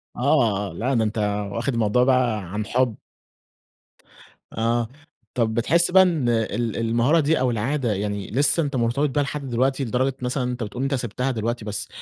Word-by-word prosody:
آه، 120 -8 +1
لا 130 +4 -1
ده 115 -2 +2
أنت 105 +1 -2 0.3
واخد 120 +5 -2
الموضوع 115 +1 +2
بقى 125 -3 +2
عن 105 +3 -5
حب. 125 0 +1 1.6
آه، 115 +1 0 0.5
طب 115 -3 0
بتحس 165 +11 +2
بقى 190 +1 +7
إن 160 -9 +1
ال 115 0 -1
المهارة 115 +7 +2
دي 155 +1 +2
أو 130 -1 +1
العادة 120 +1 -1
يعني 100 -1 -3
لسه 145 +7 +2
أنت 140 -2 -3
مرتبط 125 +5 +1
بيها 145 +2 +1
لحد 140 -1 -5
دلوقتي، 130 +3 +1
لدرجة 130 +3 0
مثلًا 125 +2 -1
أنت 125 -1 -3
بتقول 115 +5 -5
أنت 135 +1 -1
سبتها 125 +2 -2
دلوقتي، 115 -1 -3
بس 105 -1 -4
120 Hz, 170 wpm, -23 LUFS, 115-135 Hz, 1.6 s, بقى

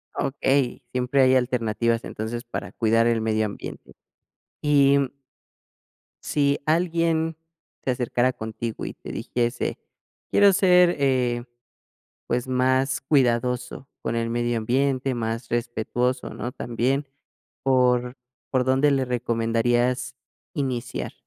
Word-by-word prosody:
Okey. 135 -1 0
Siempre 125 +2 +1
hay 130 0 +5
alternativas, 115 -2 +1
entonces, 115 +3 -5
para 120 - -6
cuidar 115 0 +2
el 115 -1 +2
medio 110 0 +1
ambiente. 105 - -8 0.7
Y 140 -1 +5
mm 135 -2 0 1.1
Si 140 -1 +1
alguien 165 -1 +1 0.5
se 130 - +1
acercara 125 0 +1
contigo 110 0 -5
y - - -5
te - - -10
dijese: 120 0 -2 0.5
"Quiero 200 -1 +6
ser, 180 -2 +5
eh, 125 -3 +1 0.8
pues, 120 +1 -1
más 130 +1 +1
cuidadoso 125 -1 0
con 115 - -2
el 115 0 -1
medio 120 0 0
ambiente, 130 +3 0
más 115 0 -3
respetuoso", 120 +2 -1
¿no?, 120 - -5
también, 125 +5 -1 0.6
¿por 125 -1 +2 0.3
por 130 -1 +2
dónde 130 +3 +3
le 135 -1 +2
recomendarías 120 +1 0 0.4
iniciar? 130 -5 -3
125 Hz, 115 wpm, -24 LUFS, 120-135 Hz, 1.1 s, Quiero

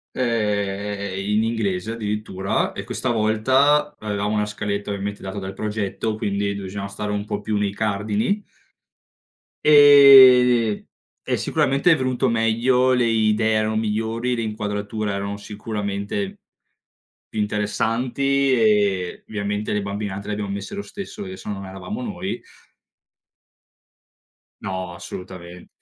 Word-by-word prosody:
ehm, 100 -4 -1
in 105 +3 0
inglese 110 -2 -1
addirittura, 105 -3 -2
e - - -6
questa 130 - -3
volta, 130 +7 +2
avevamo 105 0 -2
una 105 0 +1
scaletta 105 0 -3
ovviamente 100 +1 -4
data 95 +1 -5
dal 95 0 -6
progetto, 105 +1 -3
quindi 100 -1 -1
bisognava 100 0 -5
stare 105 +1 -4
un 105 0 -2
po' 105 -1 -4
più 105 0 -1
nei 100 -1 -1
cardini 110 - -1 1.2
ehm, 130 -6 +8 0.4
e - - 0
sicuramente 140 +6 +1
è 165 - +7
venuto 130 -1 0
meglio, 120 +3 +2
le 125 -2 +3
idee 110 -1 +2
erano 110 0 +1
migliori, 110 +3 -1
le 115 - -2
inquadrature 105 -1 -3
erano 100 +1 -3
sicuramente 105 - -4 0.9
più 110 - -5
interessanti, 120 +6 0
e 105 -6 +2
ovviamente 105 0 -3
le 105 - 0
bambine, 100 0 -4
anche, 100 +2 -7
le 105 - -2
abbiamo 100 -1 -4
messe 100 - -5
lo 200 - -3
stesso, 200 +1 -8
perché 185 -1 -7
sennò 105 - -5
non 95 0 -7
eravamo 150 - -6
noi 195 -5 -4 2.2
No, 95 -2 -4
assolutament 90 0 -9
105 Hz, 130 wpm, -22 LUFS, 100-120 Hz, 2.2 s, ehm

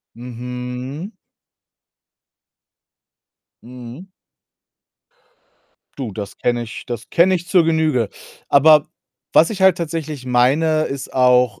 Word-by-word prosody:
Mhm. 125 - -7 2.5
Mhm. 125 +9 -11 1.9
Du, 125 -7 -5
das 100 0 -7
kenne 120 -1 -1
ich 110 - -9
das 120 -2 -7
kenne 185 +2 +4
ich 175 0 -4
zur 180 -3 +4
Genüge. 155 -9 +1 0.4
Aber 150 +1 +5 0.5
was 165 - +5
ich 200 -3 -4
halt 190 -2 +5
tatsächlich 155 -5 -5
meine, 145 +6 +2
ist 140 -3 -5
auch, 125 -4 +3
130 Hz, 100 wpm, -19 LUFS, 125-160 Hz, 2.5 s, Aber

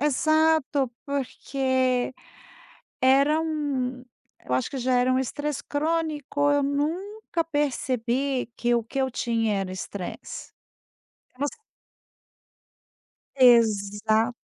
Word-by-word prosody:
exato. 300 -2 +2
Porque 260 -2 0 0.9
era 275 +4 +4
um 280 -6 -2 0.4
eu 125 - -1
acho 130 - 0
que 270 - -4
já 255 +1 +1
era 250 +1 +3
um 255 - +2
estresse 290 +2 -3
crônico, 295 -2 0
eu 285 0 +3
nunca 330 +7 -2
percebi 270 -3 -1
que 240 0 +1
o 235 - +2
que 230 +5 -6
eu 265 -1 +1
tinha 225 -3 0
era 185 -1 -4
estresse. 185 0 -7 0.9
Voc 285 +2 -1 1.9
Exa 220 -2 +4
265 Hz, 100 wpm, -25 LUFS, 240-290 Hz, 1.9 s, era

